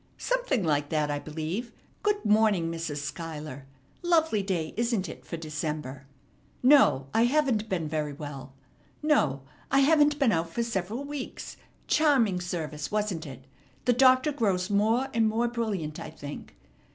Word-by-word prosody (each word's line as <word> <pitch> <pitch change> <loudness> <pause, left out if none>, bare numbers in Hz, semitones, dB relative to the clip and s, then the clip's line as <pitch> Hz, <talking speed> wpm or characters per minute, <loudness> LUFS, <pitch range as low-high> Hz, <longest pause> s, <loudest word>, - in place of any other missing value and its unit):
"Something - - 0
like 145 -3 +1
that, 150 -2 0
I 145 - -1
believe. 160 +11 -4 0.3
Good 415 - 0
morning, 210 -6 +3
Mrs. 165 -3 -4
Schuyler. 150 -3 -6 0.3
Lovely 320 - +2
day, 180 -5 -2
isn't 230 -4 0
it? 160 - -9
for 170 - -6
December. 150 -4 -5 0.6
No, 255 - +6
I 225 +1 +4
haven't 250 -5 +1
been 170 -5 -1
very 150 -1 -2
well. 140 -2 -8 0.5
No, 155 - +2 0.3
I 275 +1 +4
haven't 295 0 +4
been 275 -6 +3
out 165 -2 0
for 235 +8 -2
several 225 +2 -3
weeks. 285 -2 -6 0.3
Charming 250 - +3
service, 155 -4 -4
wasn't 205 -7 -2
it? 130 -1 -10 0.4
The 245 - +4
Doctor 255 +3 +5
grows 200 -7 0
more 220 +6 +2
and 225 -1 +3
more 230 +2 +1
brilliant, 210 -10 -3
I - - -6
think. 145 -2 -9
195 Hz, 150 wpm, -28 LUFS, 155-245 Hz, 0.6 s, No